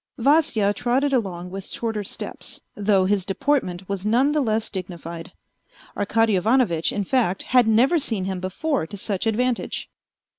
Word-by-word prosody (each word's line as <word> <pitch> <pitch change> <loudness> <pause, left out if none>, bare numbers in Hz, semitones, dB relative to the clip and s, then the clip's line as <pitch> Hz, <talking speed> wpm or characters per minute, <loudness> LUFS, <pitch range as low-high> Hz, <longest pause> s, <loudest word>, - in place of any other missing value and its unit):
Vasya 260 -6 +3
trotted 260 +6 0
along 180 -7 -2
with 195 0 -6
shorter 225 -3 -3
steps, - - -7 0.2
though 200 -2 +2
his 200 0 +1
deportment 190 -3 -1
was 195 -1 -3
none 245 +7 +3
the 300 0 +1
less 220 -3 0
dignified. 170 -3 -7 0.6
Arkady 225 +1 +2
Ivanovitch, 190 -4 +2
in 205 - -1
fact, 195 -4 0
had 250 -2 +4
never 255 +10 +4
seen 220 -9 -1
him 190 -1 -3
before 190 - -2
to 205 - -8
such 200 +1 -2
advantage. 240 +2 -1
210 Hz, 150 wpm, -23 LUFS, 190-250 Hz, 0.6 s, had